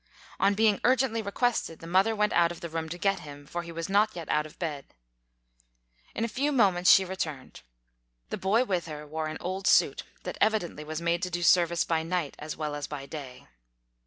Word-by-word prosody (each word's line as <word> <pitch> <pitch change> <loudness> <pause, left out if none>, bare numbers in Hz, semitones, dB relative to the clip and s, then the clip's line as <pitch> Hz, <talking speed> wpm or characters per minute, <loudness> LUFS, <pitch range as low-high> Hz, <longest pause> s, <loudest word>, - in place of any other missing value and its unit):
On 200 +1 +3
being 215 -1 +3
urgently 250 -2 +2
requested, 215 -4 -1
the - - -12
mother 190 +6 +3
went 210 0 +1
out 170 0 +4
of 175 - -8
the 170 - -5
room 160 0 -4
to 175 - -5
get 195 +1 +1
him, 145 -2 -11
for 175 +4 -4
he 170 0 -9
was 165 0 -4
not 205 +2 +2
yet 170 -3 -6
out 150 0 +1
of 155 - -18
bed. 150 - -5 1.2
In 230 - 0
a - - -1
few 275 +6 -1
moments 190 -9 +3
she 190 - +6
returned. 160 -8 -5 0.7
The - - -2
boy 210 +6 +2
with 185 -8 -2
her 150 -1 -7
wore 155 +1 -3
an 155 - -5
old 185 +2 -3
suit - - +4 0.2
that - - -6
evidently 210 -8 +1
was 155 +2 -5
made 170 +1 +1
to 185 - -1
do 175 0 -3
service 170 -1 +4
by 165 -1 0
night 165 -2 -2
as 150 +1 -6
well 150 -1 -3
as 145 -1 -4
by 140 -2 -6
day. 140 -3 -9
175 Hz, 215 wpm, -28 LUFS, 155-200 Hz, 1.2 s, she